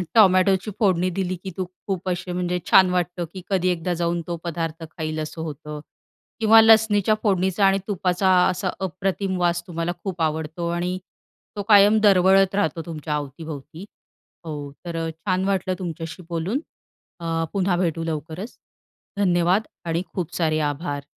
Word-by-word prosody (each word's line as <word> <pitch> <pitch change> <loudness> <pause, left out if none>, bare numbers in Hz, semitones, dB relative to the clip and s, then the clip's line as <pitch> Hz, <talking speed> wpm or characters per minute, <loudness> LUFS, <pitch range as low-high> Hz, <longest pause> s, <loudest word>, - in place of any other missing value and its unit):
टोमॅटोची 190 -1 +5
फोडणी 185 -4 +2
दिली 185 0 -2
की 190 - -5
तू 185 - -1 0.2
खूप 185 -1 -2
असे 180 0 -3
म्हणजे 180 0 -1
छान 185 -1 +7
वाटतं 180 -1 -1
की 185 - -7
कधी 185 -2 +2
एकदा 175 0 -1
जाऊन 170 0 -1
तो 170 -1 -3
पदार्थ 165 -1 -4
खाईल 155 -1 -3
असं 155 +1 -5
होतं 150 -1 -6 0.6
किंवा 225 0 +7
लसणीच्या 220 -2 +5
फोडणीचा 190 -1 +2
आणि 195 0 +4
तुपाचा 190 -1 +1 0.2
असा 185 +1 -1
अप्रतिम 190 +1 -2
वास 175 -1 +1
तुम्हाला 170 -1 -2
खूप 185 -4 -4
आवडतो 160 +2 -1
आणि 175 +2 -1 0.6
तो 205 - -3
कायम 205 +1 +7
दरवळत 195 -1 +5
राहतो 165 -5 0
तुमच्या 155 -2 -4
अवतीभवती. 150 +3 -7 0.6
हो, 145 -3 -6
तर 170 -1 -5
अ, 165 - -2
छान 185 +3 -2
वाटलं 190 -1 0
तुमच्याशी 165 0 -6
बोलून 175 - -1 0.6
अ, 165 -1 -1
पुन्हा 190 -2 +1
भेटू 165 -2 -1
लवकरच 165 +6 -5 0.6
धन्यवाद! 180 0 +3 0.2
आणि 165 +1 0
खूप 175 -2 -4
सारे 155 -2 +1
आभार. 145 -2 -5
180 Hz, 150 wpm, -23 LUFS, 165-190 Hz, 0.6 s, छान